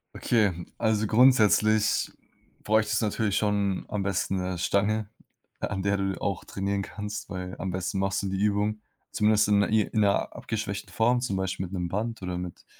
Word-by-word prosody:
Okay, 100 -7 +1
also, 110 -1 +1
grundsätzlich 110 -2 +4 0.5
bräuchtest 110 +1 +2
du - - +3
natürlich 105 -1 0
schon 100 -2 0
am 105 - -2
besten 95 0 -1
'ne 90 0 -2
Stange, 100 +4 +1 0.5
an 95 0 -3
der 100 0 +1
du 95 -1 -2
auch 100 -4 -2
trainieren 100 0 -2
kannst, 105 +1 -6
weil 90 0 -5
am 95 - -3
besten 95 +1 -2
machst 95 +1 0
du 100 - -1
die 95 0 -2
Übung, 105 +1 +1 0.3
zumindest 105 0 +3
in 100 -1 +4
i 110 -1 +4
in 110 - -2
'ner 100 -1 +1
abgeschwächten 105 -3 -4
Form, 120 +2 +2
zum 125 -6 -2
Beispiel 95 0 -2
mit 90 - -13
'nem 90 -2 -2
Band 110 +2 -3
oder 90 -1 -3
mit 90 -1 -8
100 Hz, 180 wpm, -27 LUFS, 95-110 Hz, 0.5 s, grundsätzlich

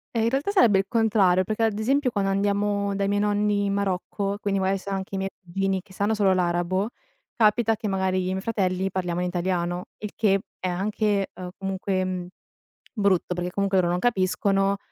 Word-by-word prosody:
Ehm, 225 - +2
in - - +3
realtà, 275 +10 0
sarebbe 235 - +5
il 195 - 0
contrario, 205 -6 +3
perché, 215 +3 -1
ad 215 -2 +1
esempio, 270 +4 +2
quando 200 -2 0
andiamo 200 0 0
dai 200 0 0
miei 205 0 +1
nonni, 205 0 +1
in 200 - 0
Marocco, 200 +1 -2
quindi, 195 -1 0
magari, 190 +1 +1
sa 200 +1 -7
anche 195 0 -3
i - - -1
miei 195 0 -2
cugini, 190 +1 -1
che 190 - -19
sanno 205 +3 0
solo 200 -3 +3
l'arabo, 180 +3 0 0.4
capita 225 0 +3
che, 215 - -4
magari, 190 -1 0
io 185 - 0
e - - -2
i 185 - -1
miei 190 - -2
fratelli 190 -3 -1
parliamo 180 -2 -2
in 180 - 0
italiano, 175 0 -1
il 210 -1 -5
che 195 -3 +2 0.2
è, 185 - -2
anche, 200 +2 0
uhm, 180 -1 -7
comunque, 195 0 -1
mhmm, 185 -1 -3 0.7
brutto, 200 -5 +1
perché 175 0 -3
comunque, 195 0 +1
loro 175 -1 +2
non 180 - 0
capiscono, 195 -2 +1
195 Hz, 205 wpm, -25 LUFS, 185-205 Hz, 0.7 s, sarebbe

